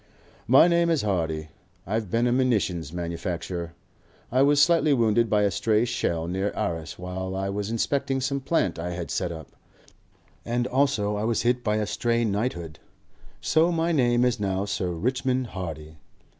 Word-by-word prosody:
"My 130 +7 +7
name 170 -1 +3
is 160 -7 +1
Hardy. 80 -6 -1 0.4
I've 110 0 -2
been 115 +5 +1
a 120 - +2
munition 115 -9 +1
manufacturer. 85 0 -4 0.6
I 130 +2 +3
was 145 +1 +4
slightly 160 -1 +4
wounded 115 -1 +2
by 105 0 +3
a 100 - +2
stray 110 +2 +1
shell 85 -8 -1
near 95 +3 -1
Arras 80 -1 -3
while 95 +1 -5
I 95 +1 -2
was 100 +1 -3
inspecting 135 +4 0
some 140 +2 -1
plant 130 - 0
I 90 +1 -3
had 85 -1 -5
set 85 - -1
up, 80 -3 -9 0.9
and 120 +1 -1
also 125 -6 +1
I 105 - -2
was 115 0 0
hit 120 +1 +1
by 105 -1 +1
a 110 0 0
stray 115 +2 0
knighthood. 100 -7 -3 0.6
So 165 +3 +3
my 165 0 0
name 120 -5 +3
is 125 -2 +1
now 95 -1 -1
Sir 95 -3 -2
Richmond 125 +8 -1
Hardy. 80 -4 -6
105 Hz, 170 wpm, -25 LUFS, 90-125 Hz, 0.9 s, My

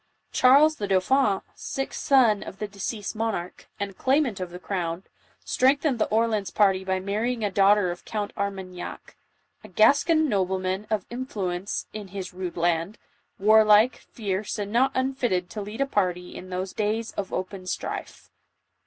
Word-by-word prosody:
Charles 290 +5 +5
the 205 - -3
dauphin, 195 +2 +2
sixth 270 - -4
son 240 -7 +4
of 190 - -8
the 210 - -4
deceased 205 +2 -5
monarch, 215 -5 -3
and 200 -1 -4
claimant 260 -5 +1
of 185 -1 -4
the 175 - -8
crown, 180 -2 -3 0.4
strengthened 270 0 +2
the - - +2
Orleans 215 -3 +1
party 195 -2 +2
by 190 0 -1
marrying 220 +5 -2
a 205 - -1
daughter 195 -1 +4
of 175 - -8
Count 210 -2 -4
Armagnac, 190 -3 -5 0.3
" - - -43
a - - -10
Gascon 310 +7 +4
nobleman 190 -2 -1
of 215 -4 -1
influence 200 -7 -3
in 210 -2 -6
his 185 -1 -7
rude 180 -1 -5
land, 170 +3 0 0.4
warlike, 215 +3 +5
fierce 205 -1 -4
and 205 -1 -4
not 260 +4 +3
unfit 260 -1 0
ted 180 -1 -1
to 215 - -5
lead 210 +5 -6
a - - +4
party 180 -8 -1
in 185 - -9
those 185 +1 -4
days 220 +1 -1
of 195 -2 -5
open 185 0 -5
strife." - - -5
205 Hz, 160 wpm, -25 LUFS, 185-230 Hz, 0.4 s, Charles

